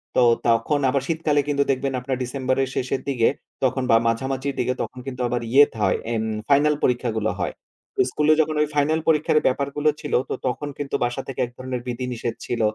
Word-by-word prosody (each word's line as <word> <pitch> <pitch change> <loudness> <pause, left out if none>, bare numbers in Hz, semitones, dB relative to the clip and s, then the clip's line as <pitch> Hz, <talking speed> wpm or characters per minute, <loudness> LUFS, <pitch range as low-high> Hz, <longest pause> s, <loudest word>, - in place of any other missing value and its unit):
তো - - +5 0.3
তখন 115 +6 +2
আবার 135 0 +1
শীতকালে 155 -3 +1
কিন্তু 140 -1 +2
দেখবেন 135 0 -1
আপনার 130 0 -3
ডিসেম্বরের 130 +1 -1
শেষের 130 +1 -1
দিকে 120 -4 +2 0.4
তখন 130 0 +1
বা - - +7
মাঝামাঝির 130 +3 -1
দিকে 125 - +1
তখন 130 - -5
কিন্তু 125 -1 -5
আবার 120 0 -1
ইয়ে 145 +2 +8
তা 110 - -9
হয় - - +2 0.2
ইম 110 -1 0 0.3
ফাইনাল 150 +2 +4
পরীক্ষাগুলো 115 -3 +1
হয়। - - -1 0.4
তো - - -9
স্কুল 150 0 0
এ - - +8
যখন 155 0 -1
ওই 150 - +2
ফাইনাল 150 +2 +2
পরীক্ষার 155 -1 +3
ব্যাপারগুলো 140 +3 +1
ছিল 145 - -5 0.2
তো - - -1
তখন 130 +4 -2
কিন্তু 145 -1 -3
বাসা 120 +2 -2
থেকে 135 - -6
এক 120 - -12
ধরনের 130 -1 -4
বিধিনিষেধ 120 -1 -3
ছিল 120 - -2
130 Hz, 200 wpm, -23 LUFS, 125-145 Hz, 0.4 s, ইয়ে